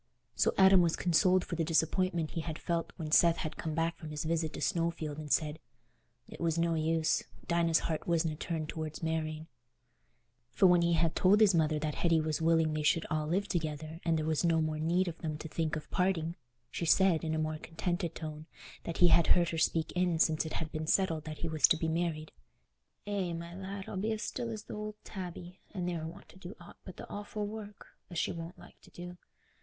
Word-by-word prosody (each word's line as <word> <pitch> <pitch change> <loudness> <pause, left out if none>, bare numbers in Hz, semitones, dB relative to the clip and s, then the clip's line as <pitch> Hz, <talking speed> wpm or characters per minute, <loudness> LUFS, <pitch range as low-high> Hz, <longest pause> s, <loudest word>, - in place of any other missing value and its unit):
So - - +2
Adam 190 -1 +7
was 170 -2 +2
consoled 180 +2 +3
for 170 - -4
the 165 - 0
disappointment 165 +1 +1
he 165 - -3
had 160 -1 -5
felt 170 -1 -2
when 155 -3 -5
Seth 170 +1 +5
had 155 - -4
come 155 -1 -4
back 165 +1 -1
from 160 - -8
his 150 -1 -4
visit 160 -1 0
to - - -6
Snowfield 165 -4 -1
and 150 -2 -7
said 155 -1 +1 0.7
"it - - -11
was 165 -1 +1
no 170 0 +2
use—Dinah's 165 +1 +1
heart 160 -2 -3
wasna 165 -2 +1
turned 160 0 -3
towards 155 0 -5
marrying." 160 -1 -2 1.0
For 125 - +2
when 180 -1 +6
he 170 -1 +2
told 190 +5 +4
his 210 -3 +6
mother 155 -2 +2
that 150 0 -2
Hetty 165 0 +2
was 155 0 -1
willing 165 -1 +3
they 155 - -1
should 160 +2 +2
all 155 -1 0
live 195 +5 0
together 155 -1 -3
and 165 -1 +2
there 155 - -1
was 155 0 0
no 165 -1 +3
more 155 -1 -1
need 175 +4 +1
of 170 -1 -5
them 155 -2 -3
to 160 - -7
think 160 0 -2
of 155 -1 -6
parting, 175 -3 0 0.4
she - - -4
said, 180 -1 +4
in 160 -1 -1
a - - -1
more 155 0 -2
contented 170 +1 -3
tone 155 -1 -7 0.4
than 170 - -4
he 175 - +5
had 170 0 +5
heard 175 -1 +4
her 165 - -2
speak 160 0 +1
in 180 -2 +1
since 160 0 +2
it - - -6
had 160 -1 -3
been 155 0 -4
settled 165 -4 +1
that 155 -1 -6
he - - -1
was 155 -5 +4
to 160 - +3
be 160 - -1
married, 160 -1 -2 0.7
"Eh, 195 -4 -2
my 170 +1 -6
lad, 195 +1 -6
I'll 195 - -5
be 215 +4 0
as 215 - -4
still 240 -2 -3
as 215 -2 -5
th' - - -12
ould 210 0 -5
tabby, 180 -1 -8 0.2
an' 180 -2 -2
ne'er 170 -3 -3
want 165 - -11
to 185 - -16
do 185 +2 -9
aught 175 - -14
but 185 - -10
th' - - -8
offal 205 0 -5
work, 210 -1 -8 0.2
as 175 - -7
she - - 0
wonna 165 0 -7
like - - -16
t' - - -17
do. 175 0 -9
165 Hz, 225 wpm, -32 LUFS, 155-180 Hz, 1.0 s, Adam